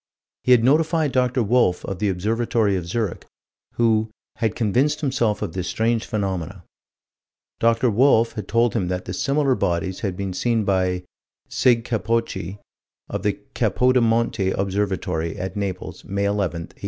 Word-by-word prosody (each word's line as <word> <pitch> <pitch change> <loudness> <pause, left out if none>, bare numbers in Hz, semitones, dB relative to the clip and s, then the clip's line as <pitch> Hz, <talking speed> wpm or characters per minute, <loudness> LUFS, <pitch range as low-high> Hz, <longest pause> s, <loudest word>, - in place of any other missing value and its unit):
He 125 - +2
had 120 -2 +6
notified 155 +2 +3
Dr. 125 -1 +1
Wolf, 110 -5 +2
of 95 - -5
the 105 -1 +1
Observatory 110 +2 0
of 90 -2 -3
Zurich, 105 0 -2 0.5
who 110 -2 +2 0.3
"had 110 -3 0
convinced 130 +8 +1
himself 120 -7 0
of 80 - -4
this 90 -1 -3
strange 115 +2 0
phenomenon." 95 -3 -3 1.0
Dr. 115 +1 +3
Wolf 115 0 +4
had 105 -4 -6
told 115 +1 +2
him 100 -6 0
that 90 0 -3
similar 140 +4 +1
bodies 95 -3 -1
had 95 -3 -3
been 95 -2 -3
seen 115 +3 0
by 95 -2 0 0.5
Sig. 120 -2 +3
Capocci, 115 -5 -2 0.5
of - - -3
the 105 0 +1 0.2
Capodimonte 115 -2 +2
Observatory, 95 -4 -1
at 95 +3 -5
Naples, 95 -3 -4
May 100 +1 -2
11, 100 +1 0
1845. 85 -3 -4
105 Hz, 145 wpm, -22 LUFS, 95-120 Hz, 1.0 s, had